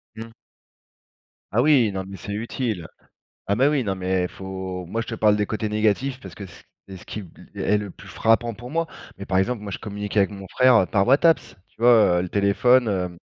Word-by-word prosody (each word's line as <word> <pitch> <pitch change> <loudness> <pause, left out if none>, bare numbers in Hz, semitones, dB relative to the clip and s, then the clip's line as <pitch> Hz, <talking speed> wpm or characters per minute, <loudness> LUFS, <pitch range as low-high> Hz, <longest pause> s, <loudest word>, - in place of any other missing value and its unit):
Mmh. 115 +1 -9 1.2
Ah 115 - +2
oui, 130 -6 +4
non 95 -1 -4
mais 95 0 -9
c'est 100 - -7
utile. 110 -4 -3 0.6
Ah 100 - +1
mais 130 +6 +3
oui, 145 -3 +1
non 100 -3 -2
mais 95 -1 -1
faut 95 -1 -6
moi 115 +6 -2
je 115 - -8
te 115 - -4
parle 105 -2 +3
des 105 0 0
côtés 110 +1 -3
négatifs 110 +5 0
parce - - -11
que 100 - -8
ce 90 - -14
q - - -31 0.2
c'est 95 -1 -9
ce - - -15
qui 105 - -6
b 90 - -17 0.2
l - - -5
est 105 - +2
le 105 -2 -5
plus - - -15
frappant 115 +1 +1
pour 120 +3 -10
moi. 165 +3 -1 0.3
Mais, 100 - -7
par 95 -1 +1
exemple, 110 +3 -1
moi 100 - -6
je - - -5
communique 105 -1 -6
avec 100 -1 +4
mon 100 -2 -9
frère, 130 +6 +4
heu, - - 0
par 100 +2 +1
WhatsApp, 155 +5 +3
tu 110 - -21
vois, 115 -7 +5
heu, - - 0
le 90 - -5
téléphone, 115 +6 +3
hem 90 -4 -2
105 Hz, 240 wpm, -23 LUFS, 95-120 Hz, 1.2 s, vois